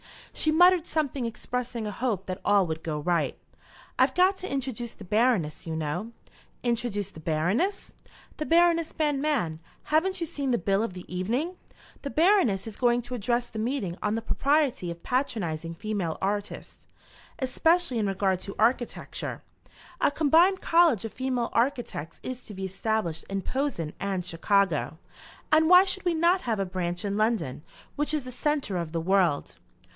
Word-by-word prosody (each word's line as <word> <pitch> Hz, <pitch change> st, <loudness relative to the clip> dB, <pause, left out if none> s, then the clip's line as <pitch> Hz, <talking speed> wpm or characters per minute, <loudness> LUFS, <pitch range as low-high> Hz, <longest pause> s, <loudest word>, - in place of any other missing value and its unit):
She 310 Hz, -, +1 dB
muttered 355 Hz, +1 st, +5 dB
something 285 Hz, -5 st, -1 dB
expressing 235 Hz, 0 st, -4 dB
a 210 Hz, -, -3 dB
hope 210 Hz, -3 st, -2 dB
that 185 Hz, 0 st, -5 dB
all 205 Hz, -2 st, +4 dB
would 160 Hz, -1 st, -4 dB
go 155 Hz, -2 st, -3 dB
right. 175 Hz, +2 st, 0 dB, 0.6 s
"I've -, -, +4 dB
got 370 Hz, +2 st, +4 dB
to 375 Hz, -, -6 dB
introduce 250 Hz, -4 st, -3 dB
the -, -, -12 dB
Baroness, 210 Hz, -7 st, +1 dB
you 160 Hz, -, -3 dB
know." 160 Hz, +9 st, -3 dB, 0.5 s
"Introduce 230 Hz, -5 st, -1 dB
the 160 Hz, -, -12 dB
Baroness?" 175 Hz, -, -1 dB, 0.4 s
"The 305 Hz, -, -3 dB
Baroness 335 Hz, -1 st, +3 dB
Banmann. 290 Hz, -, 0 dB, 0.2 s
Haven't 370 Hz, +5 st, +1 dB
you 335 Hz, -, -1 dB
seen 280 Hz, -3 st, -3 dB
the 240 Hz, -, +3 dB
bill 195 Hz, +2 st, +1 dB
of 225 Hz, -4 st, -2 dB
the 180 Hz, -1 st, -9 dB
evening? 245 Hz, -, -1 dB, 0.4 s
The 280 Hz, -, -4 dB
Baroness 315 Hz, -, +3 dB
is 220 Hz, -2 st, -8 dB
going 245 Hz, -1 st, +2 dB
to 240 Hz, +2 st, -7 dB
address 240 Hz, +1 st, 0 dB
the 220 Hz, -, -6 dB
meeting 220 Hz, -6 st, -2 dB
on 210 Hz, +1 st, 0 dB
the 225 Hz, -, -3 dB
propriety 280 Hz, -, +1 dB
of 170 Hz, 0 st, -7 dB
patronising 170 Hz, -, -2 dB
female 200 Hz, -4 st, -3 dB
artists, 205 Hz, +1 st, -4 dB, 0.5 s
especially 300 Hz, +1 st, +2 dB
in 210 Hz, -, +1 dB
regard 190 Hz, -1 st, +1 dB
to 195 Hz, -, -7 dB
architecture. 240 Hz, +2 st, -1 dB, 0.6 s
A -, -, +4 dB
combined 325 Hz, +6 st, +4 dB
college 330 Hz, -, +4 dB
of 225 Hz, -, -6 dB
female 255 Hz, -2 st, -1 dB
architects 235 Hz, -, -1 dB
is 255 Hz, -1 st, -5 dB
to 210 Hz, -, -10 dB
be 190 Hz, 0 st, -4 dB
established 190 Hz, -4 st, -2 dB
in 195 Hz, -1 st, -2 dB
Posen 260 Hz, -, -2 dB
and 190 Hz, -3 st, -2 dB
Chicago, 175 Hz, -2 st, +1 dB, 0.5 s
and 315 Hz, +1 st, +5 dB
why 360 Hz, +1 st, +9 dB
should 385 Hz, 0 st, -3 dB
we 350 Hz, -2 st, +2 dB
not 345 Hz, +3 st, +3 dB
have 225 Hz, -4 st, -1 dB
a 195 Hz, -, 0 dB
branch 180 Hz, 0 st, -3 dB
in 200 Hz, 0 st, -1 dB
London, 215 Hz, -, 0 dB, 0.3 s
which 295 Hz, +1 st, +1 dB
is 295 Hz, -, -2 dB
the 255 Hz, -, -8 dB
centre 275 Hz, -, -1 dB
of 170 Hz, -2 st, -4 dB
the 165 Hz, -, -1 dB
world?" 180 Hz, -4 st, +1 dB
230 Hz, 170 wpm, -27 LUFS, 185-290 Hz, 0.6 s, why